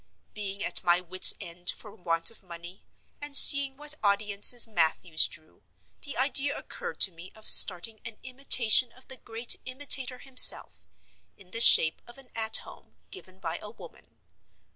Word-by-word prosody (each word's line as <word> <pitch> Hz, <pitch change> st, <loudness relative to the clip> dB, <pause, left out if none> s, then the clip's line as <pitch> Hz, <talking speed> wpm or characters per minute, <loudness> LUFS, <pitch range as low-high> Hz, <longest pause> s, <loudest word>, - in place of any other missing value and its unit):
Being 200 Hz, -1 st, -9 dB
at -, -, -2 dB
my 175 Hz, 0 st, -1 dB
wits' 185 Hz, +1 st, +5 dB
end 175 Hz, +1 st, -8 dB
for 210 Hz, -, -8 dB
want 170 Hz, -3 st, -4 dB
of 225 Hz, -, -19 dB
money, 175 Hz, 0 st, -15 dB, 0.4 s
and 290 Hz, -1 st, +1 dB
seeing 280 Hz, -1 st, +6 dB
what 295 Hz, +1 st, -6 dB
audiences 205 Hz, +3 st, 0 dB
Mathews 170 Hz, -4 st, -2 dB
drew, 155 Hz, -, -13 dB, 0.4 s
the 285 Hz, -, -12 dB
idea 280 Hz, +2 st, -2 dB
occurred -, -, -11 dB
to 190 Hz, -, +1 dB
me 170 Hz, +2 st, -16 dB
of 220 Hz, -, -14 dB
starting 220 Hz, +5 st, +4 dB
an 230 Hz, -2 st, -11 dB
imitation 255 Hz, -2 st, +1 dB
of 255 Hz, -, -22 dB
the 265 Hz, -, -10 dB
great 230 Hz, 0 st, -2 dB
Imitator 255 Hz, -1 st, -1 dB
himself, 260 Hz, 0 st, +2 dB, 0.5 s
in 185 Hz, -2 st, -19 dB
the 230 Hz, -, -3 dB
shape 160 Hz, -8 st, +2 dB
of 240 Hz, -, -17 dB
an 270 Hz, -2 st, -17 dB
"At 220 Hz, -1 st, -1 dB
Home," -, -, -19 dB, 0.2 s
given 185 Hz, -, -14 dB
by 165 Hz, -2 st, -8 dB
a 210 Hz, -, -12 dB
woman. 220 Hz, -, -19 dB
220 Hz, 165 wpm, -24 LUFS, 180-255 Hz, 0.5 s, seeing